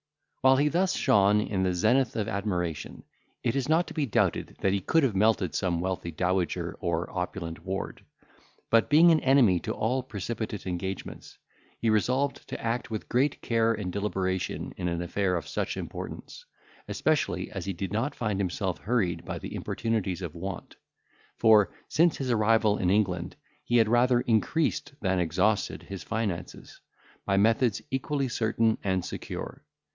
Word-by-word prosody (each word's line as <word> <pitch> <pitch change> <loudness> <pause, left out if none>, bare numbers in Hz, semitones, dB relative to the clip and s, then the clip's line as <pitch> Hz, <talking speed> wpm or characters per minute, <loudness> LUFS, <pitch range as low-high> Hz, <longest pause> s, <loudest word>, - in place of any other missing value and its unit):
While 130 +1 +6
he 145 +2 +3
thus 180 +4 +1
shone 100 +1 +4
in 100 -3 -2
the 90 -1 +1
zenith 120 +7 +2
of 105 -3 -1
admiration, 90 -5 -3 0.4
it 115 - 0
is 135 +1 -1
not 165 +3 +4
to - - -9
be 150 -4 -1
doubted, 110 - 0
that 95 - +2
he 100 - 0
could 160 - +2
have 120 -7 +1
melted 105 -4 +2
some 85 -3 0
wealthy 90 -1 -2
dowager 90 0 -1
or 85 0 -1
opulent 90 -2 -4
ward; 95 +1 -4 0.7
but, 115 -1 +4
being 165 +4 +7
an 160 - +4
enemy 130 -11 +4
to - - -4
all 125 +4 0
precipitate 110 -2 -5
engagements, 95 +1 -5 0.4
he 115 - +1
resolved 130 +6 0
to - - -5
act 115 +1 -2
with 110 -2 -5
great 135 +4 +1
care 115 -1 +2
and 95 -4 -4
deliberation 95 -2 -2
in 90 - -2
an 85 0 -1
affair 90 +1 0
of 85 - -3
such - - -3
importance, - - -7 0.4
especially - - 0
as - - -5
he 95 - -2
did 95 +2 -5
not 115 +7 -1
find 105 -4 -2
himself 95 -1 -2
hurried 105 -7 0
by - - -5
the - - -7
importunities 105 -5 -2
of 85 -4 -5
want; 90 +1 -6 0.6
for, 105 -4 +5 0.2
since 170 +1 +3
his 130 -2 -2
arrival 110 -1 +3
in 90 - +1
England, 90 -3 0 0.3
he 120 - +2
had 115 -2 +5
rather 120 +2 +4
increased 145 +6 0
than 95 -2 +1
exhausted 95 +5 0
his 95 -3 -7
finances, 95 -1 -4 0.4
by 100 - +1
methods 115 +2 +2
equally 135 +1 -1
certain 115 -2 +1
and 95 -2 0
secure. - - -6
105 Hz, 165 wpm, -28 LUFS, 95-120 Hz, 0.7 s, being